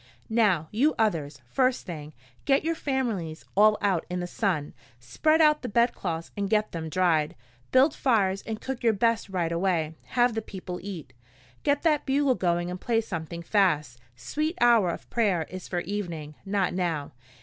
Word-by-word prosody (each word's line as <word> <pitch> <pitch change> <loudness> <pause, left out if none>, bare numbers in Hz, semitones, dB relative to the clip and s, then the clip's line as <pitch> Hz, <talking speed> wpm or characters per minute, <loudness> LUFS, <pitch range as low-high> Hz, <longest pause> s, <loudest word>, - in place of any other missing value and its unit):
"Now, 200 -9 +3
you 275 +9 +2
others, 155 - 0
first 255 - +1
thing, 155 -4 -7 0.3
get 275 0 +3
your 330 +1 +1
families 230 - -2
all 210 +1 +6
out 190 -5 +1
in 180 0 -2
the 175 - -2
sun. 175 -6 -1 0.3
Spread 310 - +2
out 300 -1 +5
the 250 - -4
bedclothes 195 -8 0
and 200 -1 -2
get 215 0 +1
them 160 -1 -5
dried. 170 -2 +1 0.4
Build 270 +4 +5
fires 200 -7 +1
and 220 -1 -3
cook 265 -2 -5
your 230 -2 +3
best 230 0 +1
right 175 -3 -1
away 170 -3 0 0.2
have 240 0 +4
the 225 - -2
people 185 -4 -7
eat. 170 -9 -7 0.5
Get 285 0 +1
that 305 -4 +2
bugle 275 0 +3
going 175 -4 0
and 180 - -6
play 230 -2 +1
something 170 -5 -6
fast 150 - +1 0.2
Sweet 305 - -3
Hour 235 -6 +5
of 170 - -5
Prayer 200 -8 +2
is 185 0 -7
for 175 -1 -2
evening, 170 -6 -5
not 195 -1 0
now. 170 -5 -2
195 Hz, 170 wpm, -27 LUFS, 170-235 Hz, 0.5 s, all